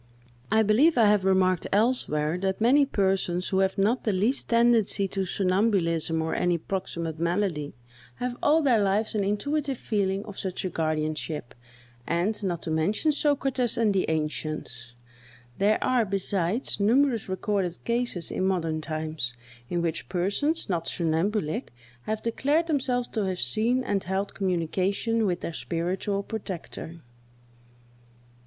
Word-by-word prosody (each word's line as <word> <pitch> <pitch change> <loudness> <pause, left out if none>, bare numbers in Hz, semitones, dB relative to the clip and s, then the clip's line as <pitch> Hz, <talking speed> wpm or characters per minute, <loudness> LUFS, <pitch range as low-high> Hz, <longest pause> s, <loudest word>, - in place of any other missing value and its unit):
I 220 0 +5
believe 250 +9 +4
I 230 - +6
have 205 -2 +3
remarked 185 -2 +2
elsewhere, 195 - +2
that 190 0 -1
many 270 +5 +4
persons, 190 -5 0
who 190 - +1
have 190 +1 +1
not 215 +6 +2
the 215 - +1
least 210 +8 0
tendency 230 -4 +3
to 195 0 -2
somnambulism 185 -5 +1
or 160 - -2
any 175 -1 +1
proximate 170 -3 -4
malady, 170 -4 -1 0.4
have 250 0 -3
all 310 +2 +4
their 240 -6 +4
lives 200 +3 +1
an 210 -2 0
intuitive 275 +7 -1
feeling 200 -3 -1
of 205 -2 -8
such 190 -1 -3
a 185 - -2
guardianship; 155 -3 -2 0.5
and, 190 +6 0
not 175 -3 -2
to 160 - -3
mention 195 - +1
Socrates 270 -5 0
and 220 -3 +3
the 190 - +1
ancients, 155 -6 -3 0.6
there 210 +2 +4
are, 250 -2 +3
besides, 195 +2 -1
numerous 235 +1 +2
recorded 190 -2 -1
cases 235 -8 -2
in - - -1
modern 165 -4 0
times, 155 -5 -3 0.3
in 175 -1 -1
which 165 -1 -3
persons, 200 - 0
not 170 -4 -2
somnambulic, 170 - -1 0.4
have 215 0 -2
declared 285 +8 +1
themselves 255 -6 0
to 215 -3 -1
have 185 -1 -2
seen 230 - +2
and 200 -4 -1
held 190 +2 -2
communication 195 +5 0
with 175 -1 -1
their 170 - -4
spiritual 185 +5 -2
protector. 180 -5 -7
195 Hz, 140 wpm, -26 LUFS, 170-225 Hz, 0.6 s, I